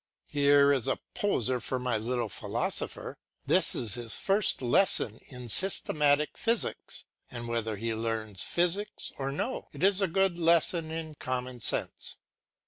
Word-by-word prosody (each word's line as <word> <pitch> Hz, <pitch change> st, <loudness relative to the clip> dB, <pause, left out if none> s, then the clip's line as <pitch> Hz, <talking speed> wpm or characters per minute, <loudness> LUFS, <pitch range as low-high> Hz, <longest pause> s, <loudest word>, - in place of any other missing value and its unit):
Here 140 Hz, -1 st, +4 dB
is 130 Hz, -5 st, 0 dB
a -, -, +1 dB, 0.2 s
poser 130 Hz, -, 0 dB
for 130 Hz, -, -3 dB
my 125 Hz, -2 st, -2 dB
little 120 Hz, +2 st, -2 dB
philosopher. -, -, -3 dB, 0.3 s
This -, -, +6 dB
is 110 Hz, -4 st, -1 dB
his 120 Hz, -2 st, -4 dB
first 200 Hz, +1 st, +2 dB
lesson 120 Hz, -, +2 dB
in 125 Hz, -2 st, -9 dB
systematic 150 Hz, -, +2 dB
physics, 230 Hz, 0 st, -1 dB, 0.2 s
and 120 Hz, -1 st, -7 dB
whether 115 Hz, -2 st, -2 dB
he 115 Hz, +3 st, -3 dB
learns 110 Hz, -3 st, -3 dB
physics 180 Hz, +4 st, -1 dB
or 135 Hz, 0 st, -2 dB
no 235 Hz, -, -4 dB
it -, -, -7 dB
is 195 Hz, +1 st, +4 dB
a 195 Hz, -, +2 dB
good 190 Hz, 0 st, 0 dB
lesson 165 Hz, 0 st, +2 dB
in 160 Hz, -1 st, -5 dB
common 130 Hz, -3 st, -5 dB
sense. -, -, 0 dB
135 Hz, 145 wpm, -29 LUFS, 120-170 Hz, 0.3 s, This